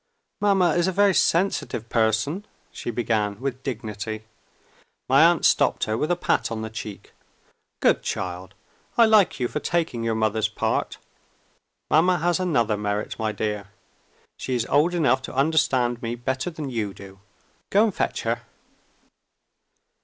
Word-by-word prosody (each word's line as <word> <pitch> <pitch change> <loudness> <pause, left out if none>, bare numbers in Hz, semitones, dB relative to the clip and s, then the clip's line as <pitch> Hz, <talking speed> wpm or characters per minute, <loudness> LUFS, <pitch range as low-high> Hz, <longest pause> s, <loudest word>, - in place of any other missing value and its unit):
"Mamma 195 -4 +3
is 175 +2 +2
a - - +1
very 200 +1 +3
sensitive 165 - +1
person," 115 - 0 0.3
she - - -6
began 110 -3 -1
with 130 -1 -4
dignity. 110 -4 -5 0.8
My - - +6
aunt - - +3
stopped - - +3
her 110 - 0
with 150 +7 -1
a 175 - +3
pat 175 - 0
on 110 -1 -3
the 110 - -6
cheek. 105 -2 -8 0.7
"Good - - +4
child! 90 +1 -5 0.4
I 235 - +7
like 215 -8 +4
you 125 - +1
for 150 - -3
taking 160 -9 -1
your 115 -1 0
mother's 110 0 +1
part. 110 - -2 0.9
Mamma 180 +3 +4
has 175 +1 +1
another 120 - +1
merit, 105 +1 -3
my 110 -1 0
dear. 105 -2 -3 0.7
She 130 - -2
is 120 -2 0
old 170 +5 +3
enough 145 -6 +2
to 130 - -8
understand 130 -5 +2
me 115 0 -3
better 130 +5 -2
than 155 -5 -6
you 105 -5 -3
do. 95 -1 -12 0.5
Go 205 +2 +4
and 220 -3 +1
fetch - - -2
her." - - -1
120 Hz, 155 wpm, -24 LUFS, 110-170 Hz, 0.9 s, I